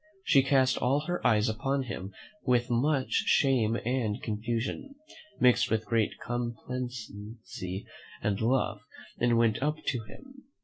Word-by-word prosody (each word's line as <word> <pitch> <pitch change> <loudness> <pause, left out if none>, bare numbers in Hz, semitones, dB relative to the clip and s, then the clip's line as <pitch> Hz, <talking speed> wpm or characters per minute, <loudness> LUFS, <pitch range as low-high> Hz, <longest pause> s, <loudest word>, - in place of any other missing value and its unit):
She 135 - +5
cast 130 -1 +3
all 135 +4 +2
her 175 +3 -3
eyes 110 0 +3
upon 135 +5 0
him 100 -5 -6 0.3
with 125 -1 +2
much 135 +3 +1 0.2
shame 120 -5 +3
and 120 -3 0
confusion, 115 - -3 0.4
mixed 125 -1 +4
with 110 -1 0
great 115 -3 +1
complacency 115 -5 -5 0.3
and 105 0 -1
love, 110 -3 +1 0.4
and 120 -1 +3
went 115 -1 +2
up 150 +2 +1
to 125 - 0
him. 270 - -14
120 Hz, 130 wpm, -29 LUFS, 110-135 Hz, 0.4 s, She